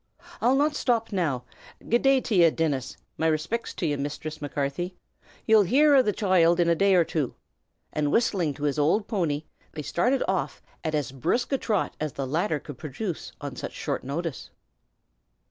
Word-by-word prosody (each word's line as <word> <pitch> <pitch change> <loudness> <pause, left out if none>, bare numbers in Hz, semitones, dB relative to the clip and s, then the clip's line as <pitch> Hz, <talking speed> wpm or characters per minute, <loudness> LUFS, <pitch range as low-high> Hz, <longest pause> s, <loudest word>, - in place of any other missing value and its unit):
"I'll 245 +4 +4
not 295 +3 +3
shtop 235 -6 0
now. 155 - -1 0.4
Good 235 +2 +3
day 270 -1 +4
t' 205 -8 +2
ye, 165 - +7
Dinnis! 150 -5 -2 0.2
My 160 - +2
respicts 160 +9 -1
to - - -2
ye, 145 -2 +1
Misthress 150 +2 -5
Macarthy. 145 +5 -3 0.5
Ye'll 220 -1 +6
hear 285 - +5
av 260 - +5
the 210 - +3
choild 180 -4 +3
in 170 - +3
a 170 - +5
day 195 +3 +3
or 175 - +5
two!" 155 -5 -2 0.6
And 150 -1 0
whistling 185 - +1
to 145 - -8
his 145 0 0
old 170 +9 +2
pony, 165 -9 -1 0.3
they 150 - -5
started 245 - +1
off - - -1 0.2
at 155 -2 -1
as 145 -5 -1
brisk 160 - -1
a 270 - +1
trot 210 -4 -1
as 155 -2 -3
the 135 - -3
latter 160 +4 0
could 140 -2 -10
produce 160 +4 -5
on 140 -3 -5
such - - -6
short - - -3
notice. 150 +3 -4
170 Hz, 185 wpm, -26 LUFS, 145-215 Hz, 0.6 s, ye